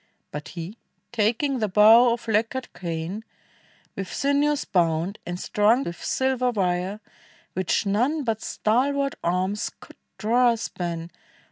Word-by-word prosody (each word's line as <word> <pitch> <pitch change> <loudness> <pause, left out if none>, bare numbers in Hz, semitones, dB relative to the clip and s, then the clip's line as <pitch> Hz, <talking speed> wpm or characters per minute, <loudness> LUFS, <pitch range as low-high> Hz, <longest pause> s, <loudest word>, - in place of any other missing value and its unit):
But 150 0 -6
he, 175 +7 -6 0.3
taking 240 +4 +1
their 215 -2 0
bow 220 +5 +7
of 235 0 -3
lacquered 225 +4 -1
cane, 170 +4 -4 0.7
With 195 -1 -5
sinews 285 +1 +1
bound, 170 +1 0
and 175 0 -4
strung 215 +8 +2
with 170 -7 -7
silver 260 -1 +1
wire, 190 -2 -1 0.5
Which 185 +3 0
none 250 +10 +1
but 225 -3 -1
stalwart 275 +5 0
arms 185 +5 0
could - - -15 0.2
draw 240 +2 +3
a - - -4
span. 170 -5 -5
215 Hz, 130 wpm, -25 LUFS, 180-250 Hz, 0.7 s, bow